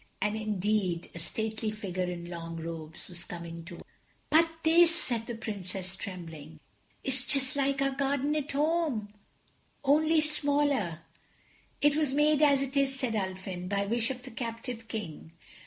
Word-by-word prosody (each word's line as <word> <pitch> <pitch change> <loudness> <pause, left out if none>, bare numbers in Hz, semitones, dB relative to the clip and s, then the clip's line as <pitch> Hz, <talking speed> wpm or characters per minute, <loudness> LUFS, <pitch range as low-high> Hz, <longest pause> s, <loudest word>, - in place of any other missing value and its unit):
And 210 +1 +1
indeed 210 -4 0
a 170 - -7
stately 220 +5 -2
figure 195 -4 -2
in 175 -1 -4
long 165 -1 -5
robes 160 -1 -6
was 175 -2 -7
coming 170 -1 -7
toward 170 0 -9
them. - - -17 0.4
"But 330 +1 +6
this," 335 +1 +6
said 235 -8 -2
the 240 - -3
Princess, 190 -4 -4
trembling, 160 -6 -7 0.4
"is 265 -1 0
just 275 -1 +2
like 275 -1 +2
our 275 - +2
garden 280 +1 +1
at 295 -1 -1
home, 290 -8 +1 0.7
only 310 +3 +5
smaller." 285 - +2 0.8
"It 290 0 +5
was 300 -3 +2
made 300 +1 +4
as 280 -2 +5
it 275 +1 -5
is," 270 -1 +2
said 255 -4 0
Ulfin, 190 -3 -3
"by 200 0 +1
wish 230 +3 +1
of 255 -1 -4
the 260 - -9
captive 230 0 -5
King. 165 -8 -6
225 Hz, 155 wpm, -30 LUFS, 185-280 Hz, 0.8 s, But